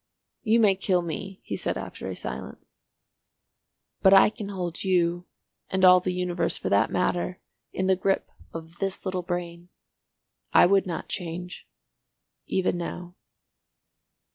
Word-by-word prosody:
"You 225 +1 +3
may 210 -3 +5
kill 185 -2 +1
me," 185 +3 -6
he - - -4
said - - -2
after - - -7
a - - -4
silence. - - -8 1.3
"But 195 0 +7
I 195 - +7
can 210 -2 -7
hold 180 -4 -4
you—and 180 +1 -1
all 180 0 +8
the 180 +1 -2
universe 180 -1 0
for - - -3
that 100 +3 +3
matter—in 180 +1 -3
the 190 0 +4
grip 190 +1 -1 0.2
of 165 +1 -9
this 195 0 -3
little 185 -1 -1
brain. 175 0 -5 0.8
I - - +8
would 195 +1 +3
not 170 -3 -4
change. 180 +1 -6 0.8
Even 185 -2 0
now." 175 +1 -6
180 Hz, 135 wpm, -26 LUFS, 175-190 Hz, 1.3 s, all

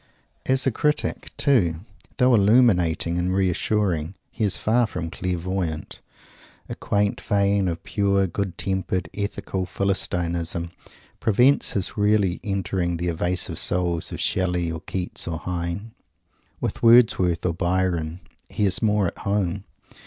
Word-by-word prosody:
As 130 0 +2
a 135 - +3
critic, 150 +6 -1
too, 90 - +2 0.4
though 125 -1 +4
illuminating 100 -7 +3
and 90 +1 0
reassuring, 95 -2 0 0.2
he - - -3
is 100 - +2
far 115 +2 +2
from 85 -5 -5
clairvoyant. 90 -3 -3 0.7
A - - -5
quaint 100 0 -1
vein 100 -1 +1
of 85 -1 -3
pure, 100 -1 +1
good 95 0 -3
tempered, 95 -1 -2
ethical 100 -2 -3
Philistinism 85 -3 -1 0.5
prevents 125 +6 +3
his 100 +1 -1
really 105 -3 +2
entering 95 -3 -1
the 85 +1 -2
evasive 90 +2 -1
souls 85 -2 0
of - - -6
Shelley 90 -2 0
or 80 - -5
Keats 90 -1 -3
or 85 -1 -2
Heine. 90 +5 -4 0.7
With - - -3
Wordsworth 115 -8 +5
or 90 - +1
Byron 90 -1 -1 0.3
he 105 - 0
is 95 - +2
more 105 -3 +2
at 85 - -4
home. 100 -1 -1
95 Hz, 130 wpm, -23 LUFS, 85-100 Hz, 0.7 s, Wordsworth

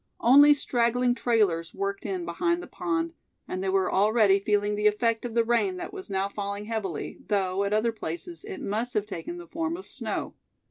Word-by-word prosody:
Only 285 +4 +8
straggling 245 -2 +1
trailers 205 -10 +1
worked 200 0 -3
in 370 -3 -3
behind 345 0 0
the - - -9
pond, 335 -2 -2 0.3
and 185 +1 -4
they 195 - 0
were 190 0 +1
already 205 0 +4
feeling 205 +1 +1
the 210 0 +2
effect 225 +2 +1
of 235 -1 -5
the 230 - +4
rain 240 - +1
that 350 - -6
was 385 -2 -8
now 195 0 0
falling 200 0 -4
heavily, 210 -7 -4
though 195 -2 +1
at 200 - -2
other 215 +2 +2
places 220 - -6
it 405 -3 -7
must 225 +5 -2
have 210 -1 +1
taken 210 - -6
the 350 - -9
form 330 0 -3
of 380 - -10
snow. - - -4
225 Hz, 195 wpm, -27 LUFS, 200-295 Hz, 0.3 s, Only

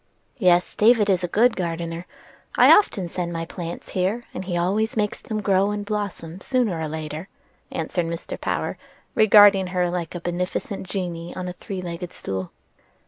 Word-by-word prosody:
"Yes, 180 -3 +3
David 215 -2 +4
is 185 -1 +1
a - - +1
good 225 +7 +3
gardener. 170 -1 -4 0.5
I - - +8
often 200 - +1
send 175 0 -3
my 165 -1 -3
sort 165 - -6
of - - -17
plants 170 -1 -6
here, 195 +6 -1
and 185 - -5
he 175 -2 -2
always 205 +6 0
makes 210 -1 -1
them 215 -1 -3
grow 195 0 +3
and 210 0 -3
blossom 200 -4 -4
sooner 235 -10 0
or 160 - -2
later," 155 +2 -5 0.4
answered 165 +1 -2
Mr. 170 0 -5
Power, - - -2 0.3
regarding 205 -3 +7
her 180 -1 0
like 175 -1 -4
a - - -3
beneficent 180 +3 -3
genie 175 -3 -4
on 185 -1 -4
a 180 - -4
three 185 +1 -6
legged 175 0 -6
stool. 95 -1 -4
180 Hz, 180 wpm, -23 LUFS, 170-205 Hz, 0.5 s, I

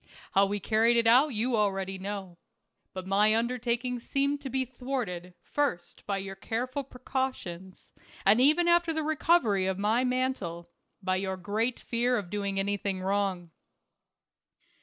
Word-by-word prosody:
How 195 +1 +4
we 205 +1 -2
carried 225 +4 +3
it 230 - +3
out 250 +6 +6
you 240 -1 0
already 195 -2 0
know. 190 -3 -6 0.5
But 185 -1 -6
my 205 +3 +4
undertaking 240 +1 -1
seemed 280 +3 0
to 270 - -5
be 260 +1 0
thwarted, 240 -9 -5
first 230 -13 -3
by 200 -1 0
your 195 0 -5
careful 245 +7 -3
precautions, 250 -9 -5 0.3
and 210 +5 +6
even 310 +6 +5
after 345 -1 +3
the 315 0 -1
recovery 300 - +2
of 190 -1 -1
my 215 +5 +2
mantle, 250 -10 -2 0.3
by 185 0 +1
your 190 0 -2
great 215 +6 -1
fear 245 +1 0
of 195 -4 -5
doing 200 -1 -2
any 200 +1 0
thing 195 -1 -3
wrong. 190 -3 -1
215 Hz, 150 wpm, -29 LUFS, 195-255 Hz, 0.5 s, out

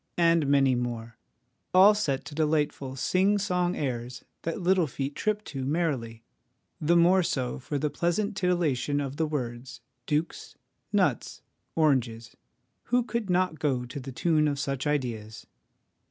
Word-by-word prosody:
' - - -49
and 165 -3 +3
many 135 -2 +4
more, 115 -2 -4 0.6
all 195 +3 +8
set 145 -11 -1
to - - -9
delightful 150 -3 0
sing 190 +9 +2
song 180 -2 0
airs 125 -2 -4 0.2
that 165 +3 -3
little 180 -2 +2
feet 135 +1 -4
trip 215 +4 -1
to 135 -7 -6
merrily, 130 -7 -2 0.6
the 165 +2 +2
more 180 +3 +5
so 130 -6 -2
for 145 +3 -4
the 150 - 0
pleasant 200 +5 -1
titillation 160 -7 0
of 140 0 -4
the 160 - +1
words 130 -3 -5 0.3
dukes, 155 +2 -2 0.3
nuts, - - 0 0.3
oranges, 125 -7 +1 0.5
who 245 0 +2
could 235 -4 -3
not 180 -3 +1
go 130 -5 0
to 125 +3 -7
the 135 0 -7
tune 155 +3 +2
of 145 -1 -1
such 140 0 -2
ideas 120 -7 -3
150 Hz, 150 wpm, -27 LUFS, 130-175 Hz, 0.6 s, all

